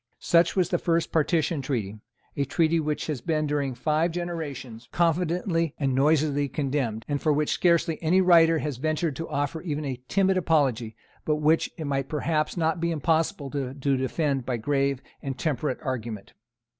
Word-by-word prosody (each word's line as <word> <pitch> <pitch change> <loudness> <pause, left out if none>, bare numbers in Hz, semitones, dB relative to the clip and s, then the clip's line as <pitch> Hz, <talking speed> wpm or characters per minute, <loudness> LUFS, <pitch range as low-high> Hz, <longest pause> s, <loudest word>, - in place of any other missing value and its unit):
Such 170 0 +3
was 180 -3 +2
the 175 -3 +1
first 165 -1 0
Partition 160 -1 +1
Treaty, 110 -6 -3 0.4
a 140 - 0
treaty 165 +4 +2
which 150 -1 -2
has 150 -5 -3
been 155 -2 0
during 145 -3 -1
five 155 +6 +1
generations 145 -9 -5
confidently 170 -1 0
and 135 -3 0
noisily 145 0 +2
condemned, 135 -7 -2
and 145 -1 -2
for 155 - +2
which 150 0 +1
scarcely 170 -2 +2
any 170 +3 +3
writer 165 -3 +6
has 150 -4 -3
ventured 155 +2 -1
to 165 - -5
offer 145 +3 -2
even 150 -4 -3
a 130 -2 -4
timid 190 -1 +2
apology, 135 -10 +1 0.3
but 155 - +1
which 155 +2 +2
it 160 - -5
may 140 -1 0
perhaps 155 +4 -1
not 165 +1 0
be 170 - +1
impossible 160 -1 0
to 135 -3 -3
defend 135 0 0
by 125 0 -2
grave 140 +2 0 0.2
and 135 -2 -4
temperate 150 -1 -1
argument. 120 -6 -5
150 Hz, 170 wpm, -26 LUFS, 135-165 Hz, 0.4 s, writer